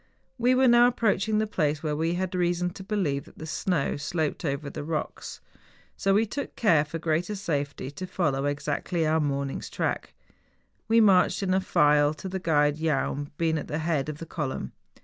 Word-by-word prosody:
We 250 +2 +4
were 260 0 +4
now 240 0 +7
approaching 220 -3 +1
the 215 - +2
place 155 -7 -1
where 150 -1 -1
we 165 +3 0
had 185 +1 -2
reason 180 0 0
to 190 +1 -10
believe 185 -9 -1
that - - -18
the 160 - -7
snow 160 -2 -1
sloped 150 +1 -2
over 140 -1 -2
the 145 - -6
rocks. 155 0 -4 0.5
So 195 0 +1
we 220 +2 +4
took 280 +6 -5
care, 165 -10 +4
for 155 +2 -6
greater 165 +5 -1
safety, 145 -8 -3
to 185 +6 -7
follow 150 -7 0
exactly 150 +4 -1
our 155 +1 +2
morning's 140 -2 -2
track. - - -3 0.7
We 225 +1 +5
marched 195 -1 +4
in 185 -1 +1
a 190 - +2
file, 150 -4 +3
the 190 +4 -5
guide 150 -3 +2
Jaun 145 -2 -1
being 160 -1 +1
at - - -7
the 150 - -3
head 155 -3 -1
of 150 - -5
the 165 - -7
column. 140 - -4
160 Hz, 190 wpm, -27 LUFS, 145-190 Hz, 0.7 s, now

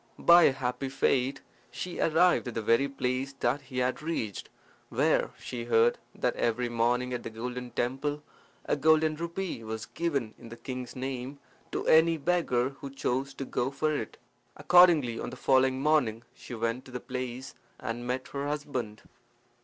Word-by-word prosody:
By 170 0 +7
a - - +6
happy 130 0 -3
fate 135 0 +1 0.3
she 180 -1 -6
arrived 165 -2 +3
at 120 - -5
the 115 - -1
very 115 +6 +3
place 130 0 -2
that 135 +1 0
he 135 -1 -9
had 125 +2 0
reached, 150 -11 -3 0.4
where - - +2
she 120 -2 -6
heard 115 0 +3 0.2
that 125 - 0
every 120 +1 0
morning 120 +2 +1
at 120 - -3
the - - -6
golden 125 +2 -5
temple 140 +5 -2 0.4
a - - +1
golden 155 +1 +3
rupee 170 -4 -4
was 110 +1 -5
given 140 -11 -2
in 115 - -11
the 115 - -9
king's 125 -1 -6
name 130 +1 -4 0.3
to - - -3
any 165 +1 +5
beggar 140 -6 +1
who 140 0 -9
chose 135 0 -2
to 135 - -5
go 125 0 -1
for 150 +3 -1
it. - - -5 0.4
Accordingly, 165 -10 +5
on - - -4
the - - -8
following 130 0 +3
morning 135 -7 +2
she 120 - -9
went 115 +3 -2
to 130 - -12
the 125 - -4
place 125 +1 -5 0.3
and 120 +1 -4
met 130 +1 -3
her 140 0 -3
husband. 130 -7 -4
130 Hz, 170 wpm, -29 LUFS, 120-145 Hz, 0.4 s, By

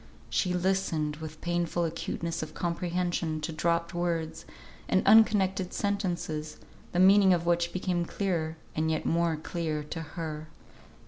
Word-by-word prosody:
She 180 - +1
listened 175 -5 0
with 155 0 -8
painful 175 0 0
acuteness 165 0 -3
of 155 -1 -7
comprehension 175 -2 -1
to 150 - -3
dropped 170 +2 0
words 170 -2 -2 0.4
and 190 - +2
unconnected 195 -4 +4
sentences, 175 -6 -2 0.3
the - - -3
meaning 190 0 +7
of 170 -1 -3
which 170 0 +2
became 180 -1 -1
clearer, 165 -5 -2 0.2
and 160 +1 +1
yet 160 -1 -1
more 170 -1 +2
clear 155 -1 -3
to 160 +2 -6
her. 155 0 -6
170 Hz, 135 wpm, -29 LUFS, 160-180 Hz, 0.4 s, meaning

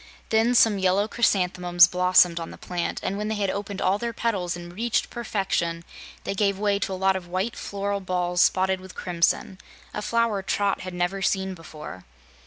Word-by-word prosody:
Then 225 +2 +3
some 220 -4 +5
yellow 190 +2 +2
chrysanthemums 180 -6 +3
blossomed 180 -1 +4
on 165 - -6
the - - -11
plant, 175 -1 -3
and 200 +2 -2
when 210 - -2
they 220 - -1
had 200 -2 0
opened 200 0 -4
all 190 +2 +2
their 235 0 -3
petals 195 -7 -1
and 175 0 -9
reached 230 +4 -1
perfection, 195 -7 -2 0.4
they - - -2
gave 200 -1 +1
way 200 0 +1
to 195 - -2
a - - -3
lot 190 0 +2
of 185 -2 -5
white 190 +6 -2
floral 200 0 -3
balls 180 -1 0
spotted 190 0 +2
with 190 -1 -12
crimson 180 +2 0 0.3
a 210 - -3
flower 230 -2 0
Trot 200 +1 0
had 185 -1 -7
never 180 +2 -1
seen 190 0 0
before. 155 - -10
190 Hz, 190 wpm, -25 LUFS, 180-205 Hz, 0.4 s, some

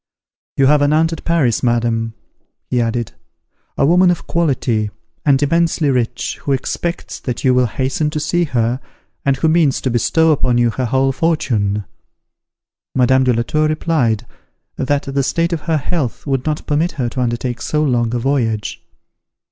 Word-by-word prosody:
"You 135 - +4
have 145 +1 +4
an 145 +1 +3
aunt 160 +1 +2
at - - -7
Paris, 150 -10 +2
madam," 115 -2 0 0.6
he 125 - +2
added, 115 0 -2 0.7
"a - - +3
woman 180 +4 +5
of 175 - -1
quality, 130 -10 0 0.4
and 135 -2 +5
immensely 165 -1 +2
rich, 125 -3 -2
who 140 - 0
expects 170 +6 -3
that 125 -3 -4
you 130 - +4
will 125 -1 +3
hasten 130 +7 -1
to 150 0 -3
see 175 +3 +1
her, 120 -3 0 0.4
and 135 -1 +1
who 160 - +1
means 155 -4 +3
to 130 - -1
bestow 160 +7 +3
upon 125 -4 +1
you 120 -1 +3
her 130 +3 -2
whole 135 +3 +2
fortune." 115 - 0 1.1
Madame 130 +1 +4
de 125 - +4
la 115 0 0
Tour 155 +5 +1
replied, 135 -8 0 0.5
that 140 +1 0
the 140 0 -1
state 165 +6 0
of 165 - -2
her 165 -2 0
health 145 -4 -3
would 135 -1 -1
not 150 0 -2
permit 155 +4 0
her 130 -7 -2
to 130 +2 -3
undertake 120 0 -2
so 150 0 0
long 120 -5 +1
a - - +1
voyage. 115 -4 -1
135 Hz, 170 wpm, -18 LUFS, 120-155 Hz, 1.1 s, woman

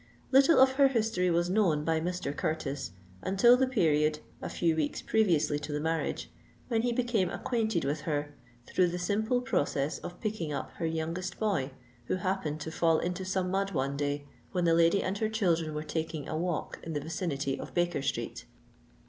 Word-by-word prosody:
Little 275 +5 +6
of 265 0 +7
her 280 -1 +7
history 220 -8 +1
was 170 0 +2
known 180 -6 +2
by 160 -1 +2
Mr. 175 -4 -3
Curtis 145 -3 -2 0.3
until 195 - +5
the 260 +1 +2
period 155 - +2 0.2
(a - - -4
few 165 -2 +1
weeks 155 -2 -1
previously 170 -9 +2
to 150 +1 -6
the 150 - -1
marriage) 160 +1 -2 0.4
when 225 -2 +2
he 240 +1 +1
became 235 -6 +1
acquainted 220 - -1
with 145 +2 -1
her 145 -2 -2 0.3
through 185 - +2
the 175 +1 -3
simple 220 +7 0
process 145 - 0
of 175 - -8
picking 210 -8 -3
up 140 -2 -4
her 165 - -1
youngest 165 +3 -3
boy 200 -12 0 0.4
who - - 0
happened 185 -5 -2
to 160 - -4
fall 165 -1 +3
into 180 +3 -2
some 185 -1 -1
mud 195 +1 0
one 135 +1 -1
day 145 0 -2 0.3
when 180 -2 +1
the 165 - +4
lady 170 +3 +4
and 195 +2 -2
her 220 - +1
children 170 -8 0
were 150 - -2
taking 160 -2 -3
a - - -3
walk 170 0 -2
in 165 - -6
the 145 - -1
vicinity 145 -3 -2
of - - -8
Baker 175 -4 +1
Street. 140 0 -3
170 Hz, 190 wpm, -30 LUFS, 150-195 Hz, 0.4 s, of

